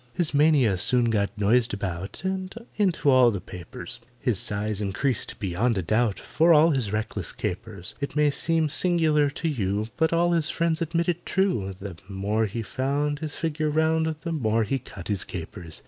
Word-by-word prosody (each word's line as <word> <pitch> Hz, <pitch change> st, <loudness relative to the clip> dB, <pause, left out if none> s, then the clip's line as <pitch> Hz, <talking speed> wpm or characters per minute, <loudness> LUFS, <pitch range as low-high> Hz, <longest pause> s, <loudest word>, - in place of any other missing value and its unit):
His 175 Hz, -4 st, +1 dB
mania 140 Hz, -, +4 dB
soon 120 Hz, +3 st, +3 dB
got 100 Hz, -3 st, +1 dB
noised 110 Hz, +2 st, +3 dB
about 95 Hz, -, -5 dB
And 190 Hz, 0 st, -3 dB, 0.2 s
into 180 Hz, -8 st, +2 dB
all 130 Hz, -2 st, +6 dB
the 100 Hz, -4 st, -2 dB
papers; 90 Hz, +5 st, -9 dB, 0.2 s
His 115 Hz, -7 st, 0 dB
size 105 Hz, 0 st, -2 dB
increased 110 Hz, +6 st, -1 dB
beyond 105 Hz, +4 st, 0 dB
a 95 Hz, -, -1 dB
doubt 110 Hz, +4 st, +1 dB
For 165 Hz, +1 st, +3 dB
all 160 Hz, +2 st, +6 dB
his 125 Hz, -8 st, -1 dB
reckless 105 Hz, -3 st, -3 dB
capers: 95 Hz, 0 st, -5 dB
It 140 Hz, -, -4 dB
may 150 Hz, -1 st, +3 dB
seem 160 Hz, +2 st, +1 dB
singular 155 Hz, -2 st, +3 dB
to 165 Hz, +3 st, -4 dB
you, 105 Hz, -6 st, -1 dB
But 160 Hz, 0 st, +2 dB
all 170 Hz, +1 st, +2 dB
his 165 Hz, -2 st, +2 dB
friends 165 Hz, 0 st, 0 dB
admit 170 Hz, +1 st, 0 dB
it 175 Hz, -1 st, -1 dB
true— 115 Hz, -, 0 dB
The 95 Hz, -3 st, -8 dB
more 105 Hz, +3 st, 0 dB
he 115 Hz, +3 st, -4 dB
found 145 Hz, +5 st, -1 dB
His 155 Hz, -2 st, -4 dB
figure 155 Hz, -1 st, -1 dB
round, 160 Hz, +1 st, +1 dB
The 165 Hz, -, -4 dB
more 115 Hz, -7 st, +1 dB
he 135 Hz, +6 st, -1 dB
cut 90 Hz, -6 st, -10 dB
his 100 Hz, -3 st, 0 dB
capers. 80 Hz, -2 st, -7 dB
130 Hz, 180 wpm, -25 LUFS, 100-160 Hz, 0.2 s, all